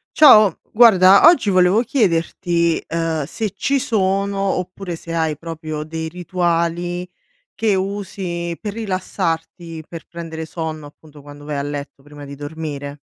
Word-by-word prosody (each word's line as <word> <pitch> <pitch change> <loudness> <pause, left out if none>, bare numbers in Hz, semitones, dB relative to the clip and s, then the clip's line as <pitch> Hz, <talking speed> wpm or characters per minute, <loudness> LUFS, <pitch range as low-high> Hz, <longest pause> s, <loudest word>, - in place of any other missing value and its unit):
Ciao, 215 - +7
guarda 200 - +7
oggi 325 -11 +5
volevo 185 +3 +4
chiederti, 170 - 0
uhm, 165 -2 -1
se 210 +6 -4
ci 275 +7 0
sono, 200 -3 0
oppure 185 -1 -3
se 165 - -8
hai 160 -2 0
proprio 155 -1 -6
dei 160 +1 -5
rituali 175 0 -2 0.4
che 215 -3 +1
usi 185 -3 -4
per 210 -2 -5
rilassarti, 175 -5 -4
per 165 -2 -9
prendere 165 -1 -7
sonno, 160 -2 -6
appunto 150 0 -17
quando 145 0 -13
vai 150 0 -4
a - - -1
letto 145 -1 -6
prima 145 0 -12
di 140 0 -9
dormire? 145 -1 -6
170 Hz, 135 wpm, -19 LUFS, 160-195 Hz, 0.4 s, Ciao